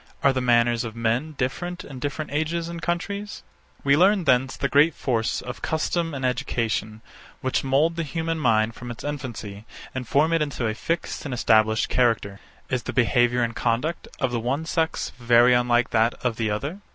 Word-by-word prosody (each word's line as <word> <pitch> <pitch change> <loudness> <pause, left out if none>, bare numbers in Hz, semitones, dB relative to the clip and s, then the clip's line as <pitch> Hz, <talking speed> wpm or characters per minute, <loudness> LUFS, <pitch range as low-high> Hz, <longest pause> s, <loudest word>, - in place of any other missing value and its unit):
Are 140 - +5
the 130 - -1
manners 120 -1 +3
of 115 -2 -6
men 115 +7 -1
different 175 +8 -3
in 135 -3 -9
different 145 +3 -4
ages 160 +3 -1
and 170 -1 -6
countries? 200 +5 -3 0.4
We 140 0 +4
learn 190 +4 +4
thence 130 -2 +2
the 140 - 0
great 145 +3 +4
force 115 -4 -1
of 125 - -7
custom 165 0 -1
and 135 -1 -3
education, 115 -4 -2 0.4
which 130 - 0
mould 145 +5 +2
the - - 0
human 165 +1 -2
mind 115 -4 +2
from 120 +2 -9
its 120 - -8
infancy 120 -8 -6 0.3
and 130 -2 -5
form 155 +6 +3
it 165 - +2
into 140 -5 -2
a 110 - 0
fixed 165 +9 -3
and 135 -3 -3
established 110 -2 +3
character. 115 -5 +1 0.3
Is 130 -2 -1
the - - -5
behaviour 120 -1 +3
and 115 -1 -2
conduct 125 +8 -1
of 130 -4 0
the 120 - -1
one 135 +7 -2
sex 160 0 -1
very 120 +1 +5
unlike 120 0 +2
that 115 +1 +2
of 115 -3 0
the 110 -2 0
other? 140 - -3
130 Hz, 190 wpm, -24 LUFS, 120-155 Hz, 0.4 s, Are